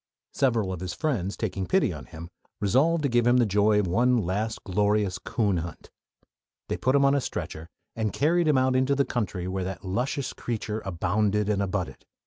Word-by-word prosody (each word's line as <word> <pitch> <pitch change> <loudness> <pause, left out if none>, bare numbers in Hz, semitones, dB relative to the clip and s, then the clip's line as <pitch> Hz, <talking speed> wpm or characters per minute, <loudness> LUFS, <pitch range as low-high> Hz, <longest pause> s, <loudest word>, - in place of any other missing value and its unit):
Several 115 -8 +1
of 90 - -5
his 90 0 -5
friends, 110 - -1
taking 95 -4 -3
pity - - +2
on - - -9
him, 85 +1 -9 0.3
resolved 145 - +2
to - - +3
give 120 -2 +2
him 120 +1 +5
the 120 - +4
joy 105 +1 +3
of 105 - +1
one 120 +8 +3
last 105 +2 -2
glorious 100 0 +1
coon 105 -6 0
hunt. 85 +1 -7 0.8
They - - -1
put 130 +2 +1
him 140 0 +4
on 140 - +4
a 140 - +2
stretcher 80 -8 -5 0.3
and 110 -2 -1
carried 165 - +2
him 150 -3 +4
out 130 0 +2
into 130 +2 +2
the 140 0 +2
country 95 -6 -3
where 95 0 -2
that 95 +1 -6
luscious 130 +8 -2
creature 110 -2 -4
"abounded 100 +3 0
and 100 -2 +1
abutted." 100 -1 -3
105 Hz, 195 wpm, -26 LUFS, 95-130 Hz, 0.8 s, him